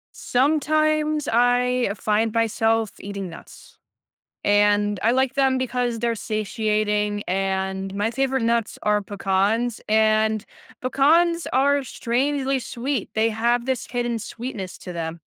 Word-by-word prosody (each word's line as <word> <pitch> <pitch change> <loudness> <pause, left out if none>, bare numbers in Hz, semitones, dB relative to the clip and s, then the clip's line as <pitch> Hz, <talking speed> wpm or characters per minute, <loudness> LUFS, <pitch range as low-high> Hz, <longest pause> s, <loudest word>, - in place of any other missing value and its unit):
Sometimes, 305 +2 +1
I 245 0 +2
find 215 +2 0
myself 225 -1 +1
eating 200 -2 -6
nuts, 170 - -14 0.6
and 205 0 +3
I 225 - +3
like 260 +1 +2
them 270 -1 +2
because 250 -2 -1
they're 235 +1 0
satiating, 210 -1 -1
and 190 0 -1
my 205 +3 0
favorite 265 0 0
nuts 230 -1 0
are 210 0 +2
pecans, 205 +4 0
and 215 0 +2 0.3
pecans 330 +6 +2
are 280 +2 +3
strangely 265 +3 -1
sweet, 250 -1 -3
they 220 +1 +3
have 235 +2 0
this 260 -3 -2
hidden 240 -1 -2
sweetness 220 -3 -6
to 180 - -8
them. 165 0 -4
230 Hz, 120 wpm, -23 LUFS, 210-260 Hz, 0.6 s, and